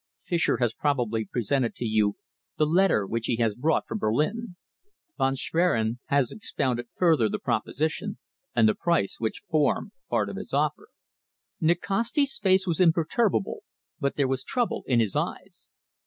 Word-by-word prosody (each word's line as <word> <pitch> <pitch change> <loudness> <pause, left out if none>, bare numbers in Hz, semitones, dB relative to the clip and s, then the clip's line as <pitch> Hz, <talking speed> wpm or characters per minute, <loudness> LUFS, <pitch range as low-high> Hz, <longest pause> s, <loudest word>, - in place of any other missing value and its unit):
Fischer 170 -2 +1
has 120 -3 +1
probably 120 -7 0
presented 125 +1 -1
to 120 - -4
you 110 -2 +2 0.4
the 155 - +3
letter 165 - +3
which 115 +3 -2
he 120 - +1
has 115 -2 +1
brought 150 +8 0
from 220 - -3
Berlin. 180 - -1 0.6
Von 135 0 +2
Schwerin 130 -7 +1
has 140 -4 +2
expounded 130 - -2
further 160 -11 +3
the - - -2
proposition 160 +9 -2 0.4
and 115 -2 +5
the 110 - +4
price 170 - 0
which 110 -1 -3
form 155 -2 +1 0.2
part - - +1
of - - -6
his - - -5
offer." - - 0 0.7
Nikasti's 230 - +1
face 190 -1 +3
was 170 -4 -1
imperturbable, 170 - +2 0.4
but 140 - -1
there 140 -2 +2
was 130 0 -1
trouble 245 -2 -1
in 125 -3 +3
his 110 -4 0
eyes. 175 +4 -4
145 Hz, 155 wpm, -26 LUFS, 115-180 Hz, 0.7 s, and